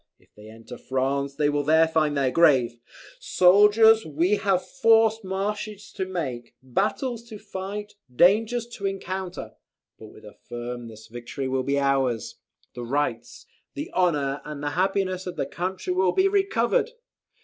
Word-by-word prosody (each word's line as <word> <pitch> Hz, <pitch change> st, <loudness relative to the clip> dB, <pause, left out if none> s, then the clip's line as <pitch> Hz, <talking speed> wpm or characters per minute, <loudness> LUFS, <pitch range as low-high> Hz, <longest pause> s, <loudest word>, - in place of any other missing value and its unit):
If -, -, -31 dB
they 105 Hz, +1 st, -14 dB
enter 115 Hz, +2 st, -12 dB
France 140 Hz, +2 st, -2 dB
they 145 Hz, 0 st, +1 dB
will 145 Hz, 0 st, 0 dB
there 160 Hz, +2 st, +4 dB
find 155 Hz, -2 st, 0 dB
their 135 Hz, -2 st, +1 dB
grave. 130 Hz, -8 st, +3 dB, 0.4 s
"Soldiers! 210 Hz, -, +5 dB
we 170 Hz, +7 st, +1 dB
have 195 Hz, -3 st, 0 dB
forced 225 Hz, -4 st, +3 dB
marches 205 Hz, +2 st, -4 dB
to 190 Hz, -, -4 dB
make, 130 Hz, -10 st, -5 dB
battles 215 Hz, -, -2 dB
to 215 Hz, -, -8 dB
fight, 205 Hz, 0 st, -7 dB, 0.2 s
dangers 220 Hz, -, +3 dB
to 200 Hz, -, -2 dB
encounter; 190 Hz, -1 st, -5 dB, 0.5 s
but, 110 Hz, -, -11 dB
with 110 Hz, 0 st, -16 dB, 0.2 s
firmness 120 Hz, -2 st, -7 dB
victory 120 Hz, +4 st, -6 dB
will, 130 Hz, 0 st, 0 dB
be 140 Hz, +2 st, -1 dB
ours. 135 Hz, -5 st, 0 dB, 0.4 s
The 120 Hz, -, -7 dB
rights, 120 Hz, -2 st, -3 dB, 0.3 s
the -, -, -6 dB
honour, 145 Hz, -6 st, 0 dB
and 150 Hz, -1 st, -7 dB
the 145 Hz, -, -1 dB
happiness 185 Hz, +1 st, -1 dB
of 180 Hz, -, -5 dB
the -, -, -2 dB
country 185 Hz, +1 st, -4 dB
will 185 Hz, 0 st, +2 dB
be 380 Hz, -, +3 dB
recovered! 390 Hz, -, +1 dB
175 Hz, 150 wpm, -25 LUFS, 135-205 Hz, 0.5 s, Soldiers